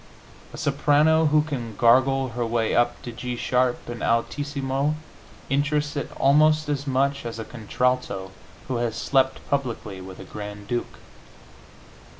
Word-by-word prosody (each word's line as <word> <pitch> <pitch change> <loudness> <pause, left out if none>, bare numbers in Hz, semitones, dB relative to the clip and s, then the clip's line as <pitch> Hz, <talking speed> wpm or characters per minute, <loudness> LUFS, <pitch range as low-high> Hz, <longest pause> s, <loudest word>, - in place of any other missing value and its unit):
A - - -9
soprano 150 +2 +3
who 150 0 +4
can 120 -8 -5
gargle 130 +4 +4
her 120 +1 -3
way 115 -1 0
up 120 0 +2
to 120 - -5
G 125 +1 -4
sharp 125 +1 0
in 120 -1 -6
altissimo 140 +4 0 0.5
interests 145 +2 0
it 145 - -3
almost 155 +2 +4
as 145 -1 -2
much 140 +1 +1
as 115 -1 -5
a 115 - -5
contralto 115 -4 -1 0.4
who 130 - -1
has 120 -2 -1
slept 130 +3 +1
publicly 115 -8 -2
with 95 0 -9
a - - -7
grand 105 -1 -8
duke. 120 +2 -3
130 Hz, 145 wpm, -24 LUFS, 115-145 Hz, 0.5 s, who